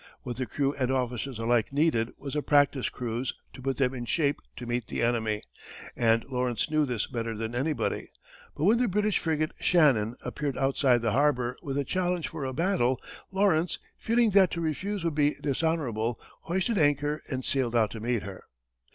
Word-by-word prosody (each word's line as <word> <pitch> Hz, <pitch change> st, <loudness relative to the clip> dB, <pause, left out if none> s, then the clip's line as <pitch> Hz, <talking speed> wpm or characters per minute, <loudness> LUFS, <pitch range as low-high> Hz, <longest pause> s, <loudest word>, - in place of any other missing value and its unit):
What 120 Hz, -3 st, -5 dB
the 130 Hz, -1 st, -2 dB
crew 140 Hz, -1 st, 0 dB
and 130 Hz, -3 st, -1 dB
officers 125 Hz, -1 st, -1 dB
alike 115 Hz, +1 st, +1 dB
needed 140 Hz, -6 st, +2 dB
was 140 Hz, 0 st, -6 dB
a 150 Hz, -, +1 dB
practice 145 Hz, -2 st, +3 dB
cruise 120 Hz, +1 st, -3 dB, 0.2 s
to -, -, -10 dB
put 135 Hz, +1 st, -1 dB
them 135 Hz, -2 st, +2 dB
in 120 Hz, -2 st, -5 dB
shape 145 Hz, +2 st, +1 dB, 0.2 s
to 125 Hz, -, -7 dB
meet 120 Hz, -1 st, -2 dB
the -, -, -2 dB
enemy, 110 Hz, -3 st, 0 dB, 0.5 s
and 115 Hz, -1 st, +3 dB
Lawrence 125 Hz, +2 st, -1 dB
knew 155 Hz, -1 st, +3 dB
this 120 Hz, -4 st, -1 dB
better 115 Hz, -2 st, -4 dB
than 115 Hz, +1 st, -4 dB
anybody, 140 Hz, +5 st, -1 dB, 0.5 s
but -, -, -2 dB
when 220 Hz, +6 st, +5 dB
the 250 Hz, -, +3 dB
British 210 Hz, +1 st, +1 dB
frigate 155 Hz, -2 st, 0 dB
Shannon 130 Hz, -10 st, +3 dB
appeared 145 Hz, -2 st, -3 dB
outside 135 Hz, -3 st, +2 dB
the 115 Hz, -, +1 dB
harbor 125 Hz, -2 st, +2 dB
with 140 Hz, -1 st, -3 dB
a 140 Hz, -, 0 dB
challenge 180 Hz, +1 st, -1 dB
for 140 Hz, -, -5 dB
a 130 Hz, -, -2 dB
battle, 130 Hz, -5 st, +1 dB, 0.3 s
Lawrence, 190 Hz, -4 st, +2 dB, 0.2 s
feeling 230 Hz, -1 st, +2 dB
that 190 Hz, -2 st, +6 dB
to 170 Hz, -, -2 dB
refuse 185 Hz, +5 st, -2 dB
would 165 Hz, -2 st, 0 dB
be 145 Hz, 0 st, +2 dB
dishonorable, 130 Hz, -7 st, -1 dB, 0.3 s
hoisted 190 Hz, +5 st, 0 dB
anchor 145 Hz, 0 st, +2 dB
and 130 Hz, -3 st, -3 dB
sailed 125 Hz, -4 st, 0 dB
out 110 Hz, -2 st, +3 dB
to 110 Hz, -, -6 dB
meet 120 Hz, 0 st, -1 dB
her. 100 Hz, -2 st, -9 dB
135 Hz, 185 wpm, -28 LUFS, 120-160 Hz, 0.5 s, that